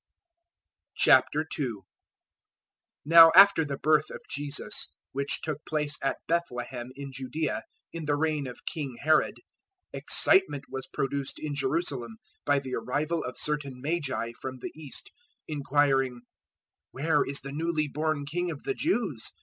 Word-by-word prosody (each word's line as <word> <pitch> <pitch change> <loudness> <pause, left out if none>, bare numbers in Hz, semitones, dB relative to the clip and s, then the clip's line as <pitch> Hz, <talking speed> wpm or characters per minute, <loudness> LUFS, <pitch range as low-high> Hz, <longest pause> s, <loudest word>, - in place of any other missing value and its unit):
002:001 145 -8 +3 1.2
Now 165 +1 +9
after 195 -3 +8
the 140 -2 -4
birth 155 0 +3
of - - -7
Jesus, 145 0 -3 0.2
which 140 +1 -1
took 150 -1 -4
place 150 -1 -2
at 135 - 0
Bethlehem 125 -7 -2
in 140 0 -7
Judaea 135 -2 -3 0.3
in 165 -2 -5
the 145 0 +1
reign 150 -2 0
of 125 - -10
King 140 -6 -4
Herod, 155 +1 +3 0.6
excitement 370 - +2
was 130 - -5
produced 140 0 -3
in 150 -1 -4
Jerusalem 135 -5 -2 0.3
by 145 0 +4
the 135 -2 -4
arrival 145 +8 -1
of 125 - -6
certain 145 -4 -2
Magi 135 -5 -2
from 130 0 -5
the - - -6
east, 150 -3 -8 0.4
002:002 155 - -4
inquiring, 135 -3 +2 0.7
"Where 150 +2 +1
is 140 0 -2
the 140 - -7
newly 155 +1 0
born 150 0 -1
king 175 +5 -2
of 155 -4 -6
the - - -1
Jews? 235 - -1
145 Hz, 140 wpm, -28 LUFS, 135-155 Hz, 1.2 s, Now